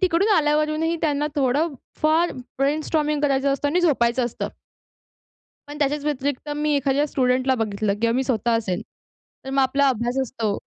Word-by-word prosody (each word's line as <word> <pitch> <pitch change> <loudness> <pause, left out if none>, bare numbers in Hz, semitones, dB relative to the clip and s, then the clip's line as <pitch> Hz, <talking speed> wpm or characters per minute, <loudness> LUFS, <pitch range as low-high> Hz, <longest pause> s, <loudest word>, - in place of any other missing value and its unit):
तिकडून 370 +2 +2
आल्यावरूनही 305 +2 +1
त्यांना 295 -2 0
थोडं 285 +3 +1 0.3
फार 320 +3 +3 0.3
ब्रेनस्टॉर्मिंग 300 +1 0
करायचं 275 -1 +2
असतं 285 +1 -1
आणि 355 +5 +1
झोपायचं 250 -7 +2
असतं. 235 - -4 1.2
पण 295 0 -8
त्याच्याच 290 0 0
व्यतिरिक्त 285 0 -2
मी 300 0 +1
एखाद्या 280 +1 +1
स्टुडंटला 255 0 +1
बघितलं 215 -3 -1
किंवा 230 0 +2
मी 265 - +1
स्वतः 235 -2 0
असेन 190 -5 -2 0.6
तर - - -5
मग 270 0 +1
आपला 275 +2 +2
अभ्यास 245 +1 -1
असतो. 225 -5 -2
280 Hz, 150 wpm, -23 LUFS, 255-300 Hz, 1.2 s, फार